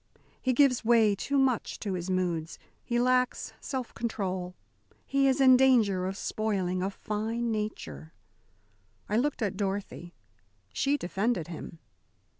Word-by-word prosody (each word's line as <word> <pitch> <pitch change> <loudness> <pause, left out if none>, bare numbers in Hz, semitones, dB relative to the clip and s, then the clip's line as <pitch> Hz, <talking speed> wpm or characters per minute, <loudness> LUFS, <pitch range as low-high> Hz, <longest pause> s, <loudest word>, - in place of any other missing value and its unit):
"He 260 - +1
gives 255 -1 +3
way 225 -2 +5
too 280 +8 -1
much 265 -3 +1
to 200 -3 -2
his 180 0 -4
moods. 175 -3 -1 0.3
He 240 - -1
lacks 250 0 +1
self 260 -3 -4
control. 185 -6 -3 0.5
He 275 0 +2
is 265 +1 +2
in 260 -1 +7
danger 220 -8 +3
of 190 +1 -4
spoiling 190 -6 -1
a 190 - 0
fine 220 +3 -3
nature." 80 - -5 1.0
I 210 - 0
looked 260 -1 0
at 200 -2 -2
Dorothy. 195 -3 -4 0.6
She 280 - +1
defended 195 - -1
him. 165 0 -8
215 Hz, 135 wpm, -29 LUFS, 185-250 Hz, 1.0 s, in